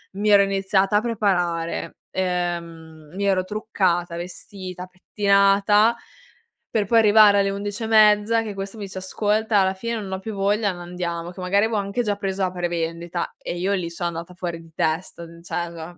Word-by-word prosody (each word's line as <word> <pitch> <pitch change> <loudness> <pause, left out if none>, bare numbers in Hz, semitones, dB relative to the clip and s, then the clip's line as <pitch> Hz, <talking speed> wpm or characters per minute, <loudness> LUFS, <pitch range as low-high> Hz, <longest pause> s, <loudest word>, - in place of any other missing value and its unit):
mi 210 +2 0
ero 200 -1 +7
iniziata 195 0 +1
a - - +2
preparare, 180 -7 -1 0.2
ehm, 170 -4 -4
mi 200 +1 -2
ero 190 -2 +2
truccata, 185 -5 -1
vestita, 185 +1 -8
pettinata 200 +3 +3 0.8
per 215 -2 +1
poi 230 +3 +4
arrivare 210 -1 +6
alle 195 0 +2
11 205 +2 -5
e - - -2
mezza 215 +1 +5
che 215 -2 -5
questo 195 +2 -6
mi 205 - -5
dice: 190 -1 -7
"Ascolta 210 +3 0
alla 190 -1 +2
fine 230 +5 -3
non 195 -3 -7
ho 190 - -3
più 220 +3 -6
voglia, 200 +1 +1
non 175 - -10
andiamo." 175 -1 -4
Che 185 - -10
magari 200 +3 +2
avevo 220 -1 -1
anche 200 +4 -1
già 205 -2 0
preso 195 -1 -2
a 185 - -2
prevendita 170 -1 -3
e 175 - -5
io 190 +3 0
lì 180 -4 -2
sono 175 +1 -3
andata 170 +1 -7
fuori 170 -2 -5
di 165 -1 -17
testa. 165 +1 -2 0.2
Cioè 170 0 -5
195 Hz, 180 wpm, -23 LUFS, 175-205 Hz, 0.8 s, ero